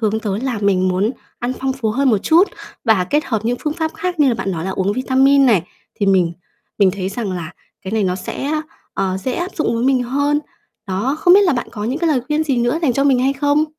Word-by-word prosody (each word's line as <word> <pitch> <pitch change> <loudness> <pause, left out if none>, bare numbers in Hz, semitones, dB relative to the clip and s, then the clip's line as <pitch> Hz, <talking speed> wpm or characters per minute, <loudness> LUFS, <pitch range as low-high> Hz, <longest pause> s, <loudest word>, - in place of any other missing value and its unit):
hướng 220 0 0
tới 205 0 -2
là 255 -5 -2
mình 190 -2 +2
muốn 190 +5 +1 0.3
ăn 245 +1 -2
phong 265 0 0
phú 235 -5 -2
hơn 265 +3 +2
một 210 - +3
chút 335 - +4 0.4
và 215 -6 +3
kết 295 +1 +2
hợp 220 -3 -2
những 245 +1 0
phương 300 - -1
pháp 320 -1 -2
khác 360 -3 -3
như 280 - +5
là 240 - +2
bạn 195 - -3
nói 165 0 -4
là 190 - -2
uống 190 +1 0
vitamin 265 +2 +3
này. 205 -9 +4 0.3
Thì 200 - -1
mình 180 -3 +3 0.5
mình 195 -2 +5
thấy 190 -1 -4
rằng 200 -2 -4
là 170 -2 -5 0.3
cái 190 +2 -6
này 220 -2 +1
nó 180 - 0
sẽ, - - -6
á, 305 +2 -1 0.3
ờ, 190 -1 -1
dễ 250 +7 -3
áp 350 +6 -3
dụng 305 -7 0
với 230 +2 -1
mình 260 -2 +3
hơn. 285 +4 0 0.5
Đó, 205 +10 -1
không 355 +1 +6
biết 405 - +7
là 345 - +3
bạn 245 - -3
có 210 0 -5
những 260 +7 -2
cái 335 -1 +1
lời 270 -5 +2
khuyên 305 +1 0
gì 270 -4 0
nữa 240 +6 +1
dành 265 -6 +2
cho 275 +3 +1
mình 265 -3 +4
hay 265 +2 +2
không? 290 +2 +2
245 Hz, 265 wpm, -18 LUFS, 200-285 Hz, 0.5 s, biết